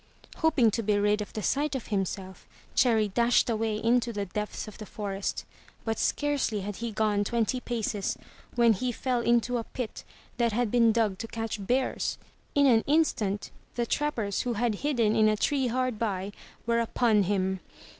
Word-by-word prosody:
Hoping 295 -9 +3
to 230 - -1
be 210 -1 +1
rid 210 +1 +2
of 205 - -6
the 215 - -4
sight 285 0 0
of 260 - -4
himself, 190 -2 -3 0.3
Cherry 225 -4 +3
dashed 235 +3 +3
away 220 -1 0
into 235 +2 +2
the 205 -2 -3
depths 210 +4 -4
of 215 - -11
the 215 - -7
forest. 200 -2 -4 0.4
But 225 -1 -1
scarcely 285 -8 0
had 200 0 -5
he 235 -1 -3
gone 210 -1 +1
twenty 235 +3 0
paces 225 -5 -2 0.4
when 235 -2 +5
he 250 +5 -1
fell 250 +1 -1
into 240 +1 +2
a - - -3
pit 240 0 -6 0.3
that 235 -2 +1
had 235 -1 0
been 235 -2 +5
dug 215 -4 +1
to 225 - -4
catch 225 -2 -4
bears. 255 +6 0 0.4
In 285 0 +5
an 230 -4 +5
instant 255 -10 +1 0.2
the 240 - 0
trappers 230 -7 -1
who 245 - -1
had 230 +1 +1
hidden 240 -7 +2
in 215 -1 +5
a 215 - +1
tree 270 +3 +1
hard 255 -2 -1
by, 200 -3 -2 0.3
were 235 0 +2
upon 230 -2 +2
him. 190 -1 0
225 Hz, 180 wpm, -28 LUFS, 210-245 Hz, 0.4 s, when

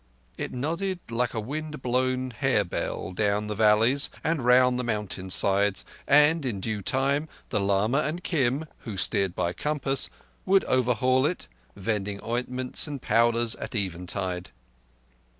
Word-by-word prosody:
It - - -5
nodded 170 +8 -2
like 120 +1 -1
a - - -1
wind 150 +5 -5
blown 130 +1 0
harebell 110 -8 -1
down 105 +2 0
the 105 - -3
valleys 110 +6 +3
and 160 -5 0
round 125 0 +4
the - - -1
mountain 105 -5 -3
sides, 100 +1 +4 0.2
and 150 +2 +5
in 115 -7 -2
due 105 +1 -3
time 140 - 0 0.2
the 105 - 0
lama 100 +7 +1
and 155 +4 -2
Kim, 140 -2 0
who 105 -4 -7
steered 95 -1 +1
by 85 -1 -1
compass, 140 0 0 0.3
would 195 0 +3
overhaul 130 +1 +2
it, 180 - -4 0.3
vending 100 -1 -3
ointments 125 +4 -1
and 145 -2 -5
powders 115 0 +2
at - - -7
eventide. 90 -1 -3
120 Hz, 140 wpm, -26 LUFS, 105-140 Hz, 0.3 s, and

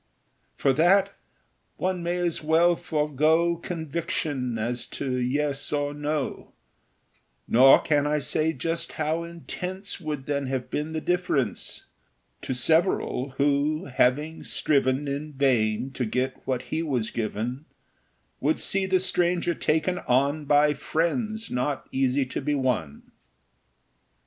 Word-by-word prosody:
For 135 - +2
that, 190 +7 +4 0.6
one 185 -1 -1
may 175 +1 -1
as 175 -3 -1
well 165 +3 +4
forego 155 +3 +1
Conviction 155 -6 -3
as 120 +2 -3
to 130 -2 -3
yes 140 +3 -1
or 145 -1 -1
no; 150 -1 -3 0.9
Nor 130 +3 +7
can 145 -1 +2
I 150 0 +1
say 155 +2 0
just 165 +4 -3
how 160 +2 -1
intense 180 +4 -6
Would 150 -4 -4
then 140 -1 -1
have 130 -1 -3
been 150 +2 -2
the 160 - -2
difference 175 - -1 0.6
To 130 - -3
several, 140 -2 +1
who, 145 +2 +1
having 150 +6 +1
striven 140 -1 +1
In 145 +2 -4
vain 130 -3 +1
to 130 -2 -2
get 125 +3 -2
what 130 -2 -1
he 160 - +1
was 130 -9 -1
given, 120 +5 -3 0.7
Would 150 +4 +1
see 195 0 +1
the 190 -1 +3
stranger 175 -1 +1
taken 160 +3 0
on 140 +4 +1
By 145 +1 +4
friends 215 - -2
not 130 +3 -2
easy 135 +1 +1
to 130 - -4
be 145 +1 0
won. 125 - -2
150 Hz, 130 wpm, -26 LUFS, 130-165 Hz, 0.9 s, Nor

